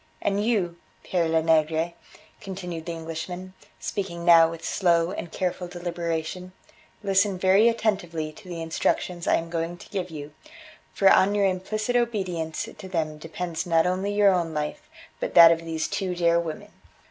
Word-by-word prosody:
"And 200 +1 0
you, 195 -7 0 0.3
Pere 175 -3 0
Lenegre," 160 +1 +2 0.5
continued 180 -4 -6
the - - -2
Englishman, 165 +3 -6 0.3
speaking 170 -4 -4
now 165 -1 +7
with 165 -1 -8
slow 170 -2 +2
and 175 -4 -6
careful 180 -1 -2
deliberation, 175 0 -4 0.5
"listen 195 0 +2
very 195 +5 +5
attentively 185 -9 -1
to 180 +4 -14
the 170 -2 -5
instructions 170 +1 -1
I - - +4
am 165 0 -3
going 170 +1 -2
to - - -14
give 185 -3 -3
you, 150 -2 -8 0.6
for 195 - +2
on 195 +1 +5
your 200 -1 +3
implicit 215 +5 -1
obedience 190 -9 -1
to 190 - -10
them 155 -4 -2
depends 165 +2 -4
not 165 -1 +3
only 185 +3 0
your 205 -1 +4
own 170 -3 -1
life 225 - -4 0.3
but - - -4
that 170 -1 +10
of 165 - +2
these 160 -1 -2
two 185 -3 -2
dear 170 -1 +3
women. 165 -2 -6
175 Hz, 160 wpm, -25 LUFS, 165-190 Hz, 0.6 s, that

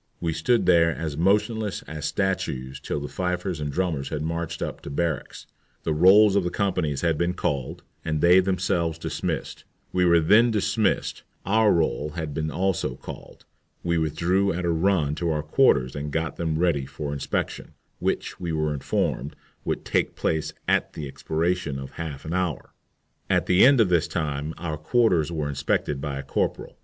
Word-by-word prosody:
We 85 -2 -1
stood 100 +10 +2
there 85 -2 +5
as 80 -3 -3
motionless 105 +5 +1
as 75 -1 -5
statues 65 -10 -2
till 75 - -3
the 70 - -5
fifers 90 -1 -2
and 75 -1 -3
drummers 80 -5 -1
had 75 - -3
marched 85 +1 -3
up - - -5
to - - -8
barracks, 80 0 -3 0.4
the 80 - 0
rolls 95 +6 +6
of 100 - +3
the 90 - -1
companies 85 -8 -1
had 85 -3 +1
been 85 +1 0
called, 70 -7 -2 0.2
and 80 -1 -1
they 90 +4 +6
themselves 90 -3 0
dismissed. - - -4 0.3
We 90 - +2
were 85 -1 +5
then 105 +9 +5
dismissed, 110 -1 0 0.2
our 110 +2 +4
roll 75 -2 0
having 80 -3 -4
been 80 +1 -2
also 90 -7 -1
called. - - -11 0.4
We 85 -1 +1
withdrew 85 +6 +1
at 90 +1 -3
a 85 - +2
run 80 -3 +2
to 85 - +1
our 75 -2 -1
quarters 75 - +3
and 75 +1 -4
got 80 +1 -2
them 80 -2 -1
ready 80 -6 +1
for 75 -1 -5
inspection, 70 - -3 0.3
which, - - -2
we 85 -2 -3
were 75 -1 0
informed, 70 0 -2 0.3
would - - -3
take - - 0
place 80 -1 -1 0.2
at - - +1
the 75 - -5
expiration 80 +1 -1
of 65 0 -7
half 80 -4 -6
an 80 - -4
hour. 90 -4 -2 0.6
At - - +2
the 90 +1 +5
end 135 0 +7
of 110 -5 +4
this 85 -2 +2
time 75 -1 -3
our 80 -2 -4
quarters 85 - +2
were 75 -3 -2
inspected 70 0 -1
by 70 -1 -3
a 70 - -5
corporal. 70 - -2
80 Hz, 180 wpm, -25 LUFS, 75-90 Hz, 0.6 s, end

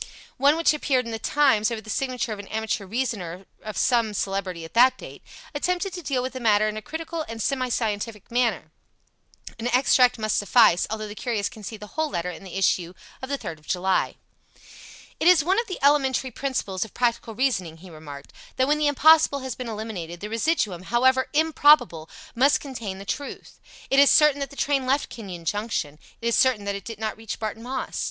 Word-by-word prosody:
One 280 +3 +4
which 330 -1 +3
appeared 265 -4 0
in 230 - -6
The 225 - -4
Times, 260 -5 +3
over 230 -2 -4
the 220 - -15
signature 250 -3 -2
of 205 - -8
an 200 - -9
amateur 220 -2 -3
reasoner 195 -6 -3 0.2
of 215 -1 -7
some 230 -4 +2
celebrity 190 -4 -3
at 165 - -13
that 250 +3 +5
date, - - -11 0.3
attempted 360 +5 -1
to 355 - -6
deal 270 -5 -1
with 260 - -4
the 260 - -5
matter 215 -3 +3
in 215 - -3
a 215 - -5
critical 320 +4 -5
and 225 0 -6
semi 255 +2 -1
scientific 215 -2 -3
manner. 230 -10 0 0.9
An 230 - -2
extract 250 0 +4
must 215 -1 0
suffice, 205 -3 +4
although 215 -1 -4
the 205 - -7
curious 215 -2 -2
can 220 - -13
see 220 +2 -6
the 210 - -9
whole 315 +8 -2
letter 175 -6 -3
in 180 - -11
the 190 0 -7
issue 180 -2 +1 0.3
of 260 - -6
the 280 - -1
3rd 170 - -7
of 155 - -24
July. 185 +1 0 1.0
"It - - +2
is 355 -4 +6
one 375 +7 +2
of 470 - -2
the 370 - -5
elementary 270 -2 +3
principles 220 -8 -2
of 220 - -12
practical 235 -2 -1
reasoning," 190 -10 -1
he 180 +2 -13
remarked, 145 -3 -11 0.2
"that 260 - +2
when 300 +1 +2
the 300 - +2
impossible 295 0 +5
has 260 -1 -4
been 250 0 -6
eliminated 205 -6 -6
the 210 +3 -7
residuum, 225 - 0
HOWEVER 260 +3 +2
IMPROBABLE, 290 - +4 0.2
must 270 +4 +3
contain 230 -9 -6
the 195 - -9
truth. 285 +7 -6 0.3
It 270 - +5
is 280 - +7
certain 300 -2 +5
that 275 - -3
the - - -13
train 275 -2 0
left 275 +3 +1
Kenyon 185 -7 -8
Junction. 170 -6 -2 0.2
It 235 - -2
is 235 - +1
certain 245 -6 +3
that 200 - -1
it 200 -1 -7
did 225 -2 -7
not 220 +1 -4
reach 225 -2 -6
Barton 220 0 -5
Moss. 255 +2 -4
230 Hz, 210 wpm, -24 LUFS, 200-270 Hz, 1.0 s, is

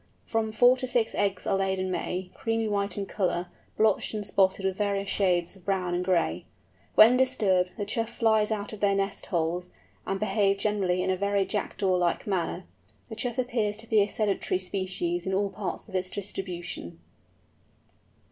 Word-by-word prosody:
From 225 -1 -1
four 245 +4 +5
to 255 0 -3
six 240 -3 +1
eggs 200 -2 -1
are 195 - +1
laid 190 0 0
in 185 0 -2
May, 180 0 -3
creamy 225 -1 -1
white 200 -2 -1
in 200 - -1
ground - - -10
colour, 180 -3 0 0.3
blotched 215 0 +2
and 210 -1 -2
spotted 195 -1 +2
with 190 -1 0
various 200 -1 -1
shades 180 -2 +1
of 190 - -18
brown 185 -2 -1
and 175 +1 0
gray. 170 - +1 0.5
When 230 +4 +8
disturbed, 195 -8 +2
the 205 - -2
Choughs 225 +2 -2
fly 225 -2 +3
out 210 -1 -3
of 215 - -8
their 200 -1 +3
nest 195 0 -2
holes, 175 0 -1 0.4
and 195 0 -1
behave 200 -1 +2
generally 195 -3 0
in - - +1
a - - +1
very 200 0 +1
Jackdaw 195 -2 -1
like 175 -1 0
manner. 180 -2 -2 0.4
The 220 - -6
Chough 240 +2 -3
appears 235 -5 0
to 225 +1 -8
be 220 -2 +4
a 200 - +2
sedentary 205 -3 0
species 185 -2 -2
in 190 - 0
all 200 0 0
parts 200 +2 -5
of 205 - -14
its 185 0 0
distribution. 175 - -6
195 Hz, 185 wpm, -27 LUFS, 185-215 Hz, 0.5 s, When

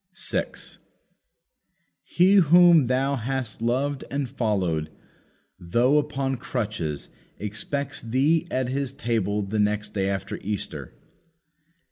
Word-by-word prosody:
6. - - -1 1.2
"He 185 +3 +3
whom 170 -4 +6
thou 135 +2 +1
hast 125 -1 -4
loved 130 +4 0
and 140 +1 -2
followed, 95 - -1 0.7
though 120 +11 +3
upon 135 -3 -2
crutches, 105 - -3 0.3
expects 135 +7 -3
thee 135 +8 +1
at 130 -1 -1
His 135 0 -2
table 115 -7 -1
the 105 +2 -2
next 105 0 0
day 95 -1 0
after 95 -2 -3
Easter." 105 0 -5
125 Hz, 105 wpm, -25 LUFS, 105-140 Hz, 1.2 s, whom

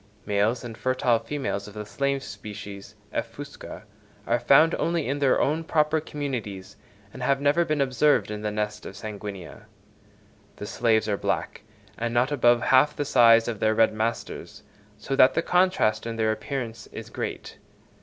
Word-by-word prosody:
Males 105 +4 +1
and 115 -2 -7
fertile 125 -1 +1
females 115 -5 -4
of 105 - -12
the 105 0 -6
slave 140 +4 -1
species 100 -2 -9 0.2
(F. - - -3
fusca) - - -9 0.4
are 120 - +1
found 140 +7 +5
only 170 -2 0
in 140 +2 -1
their 140 -2 +3
own 155 +4 +1
proper 155 -1 +1
communities, 110 -11 -5 0.4
and - - -9
have 135 +2 +1
never 145 +4 +3
been 155 -3 -1
observed 135 -2 +2
in 105 0 -5
the 105 - -2
nests 105 0 -3
of - - -8
F. - - -16
sanguinea. 100 -3 -8 0.9
The - - -7
slaves 110 0 +1
are 100 -2 0
black - - -2 0.4
and 120 +1 -2
not 125 +4 +2
above 120 -4 +3
half 140 +3 +4
the 145 - -2
size 115 -3 +5
of 115 -3 -3
their 110 0 +2
red 115 -1 +4
masters, 110 +2 -4 0.3
so 125 +6 -3
that 130 +1 +6
the 165 - +1
contrast 180 - +2
in 115 - -4
their 110 -1 +1
appearance 115 0 -5
is - - -9
great. - - -6
120 Hz, 175 wpm, -25 LUFS, 105-140 Hz, 0.9 s, that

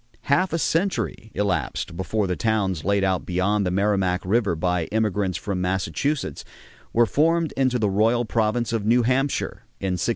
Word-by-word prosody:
Half 180 +6 +2
a 165 - 0
century 165 - -1
elapsed 90 -3 -1
before 100 +4 -1
the 90 -1 -1
towns 100 -7 0
laid 100 +1 +1
out 95 -2 +1
beyond 95 +3 0
the - - +1
Merrimac 95 -1 +1
River 100 -2 +1
by 90 0 0
emigrants 105 -3 0
from 95 -3 -3
Massachusetts 95 - -1 0.5
were 120 +1 +4
formed 165 +5 +2
into 130 -2 +2
the 110 -3 +1
royal 110 +5 +2
province 110 +1 0
of 115 -3 0
New 120 +3 +3
Hampshire 130 +4 0 0.2
in 95 -1 -1
1679. - - 0
105 Hz, 165 wpm, -24 LUFS, 95-120 Hz, 0.5 s, were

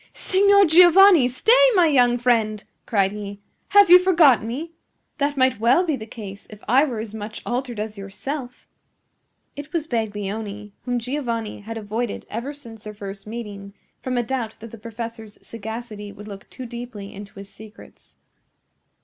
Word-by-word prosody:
"Signor 400 +1 +4
Giovanni! 350 -2 +7
Stay, 255 - +2 0.2
my 360 -2 +5
young 245 -5 +3
friend!" 225 -4 +1 0.2
cried 195 -3 +1
he. 200 -1 -7 0.3
"Have 405 -1 +6
you 360 - +11
forgotten 325 - +4
me? 295 +8 -5 0.5
That 285 0 0
might 260 -3 +2
well 250 +11 +3
be 315 -4 0
the 220 -4 -9
case 200 -3 -10
if 210 -1 -13
I 260 +5 +5
were 250 -6 -4
as 215 -1 -6
much 215 0 -7
altered 245 -2 -3
as 210 -1 -5
yourself." 250 +6 -7 0.9
It 290 +1 -9
was 330 -3 -1
Baglioni, 210 -3 -4
whom 245 -1 -1
Giovanni 235 -3 -3
had 225 +2 -7
avoided 220 +2 -4
ever 235 +6 -4
since 235 -7 -13
their 210 0 -8
first 200 0 -9
meeting, 205 -3 -8 0.3
from 255 -1 -3
a 240 - +1
doubt 230 -2 -4
that 225 0 -11
the 230 - -11
professor's 225 -1 -8
sagacity 220 -2 -8
would 210 +1 -12
look 200 -2 -10
too 255 - -9
deeply 235 -4 -8
into 200 0 -11
his 200 0 -10
secrets. 220 +1 -16
230 Hz, 165 wpm, -22 LUFS, 210-265 Hz, 0.9 s, you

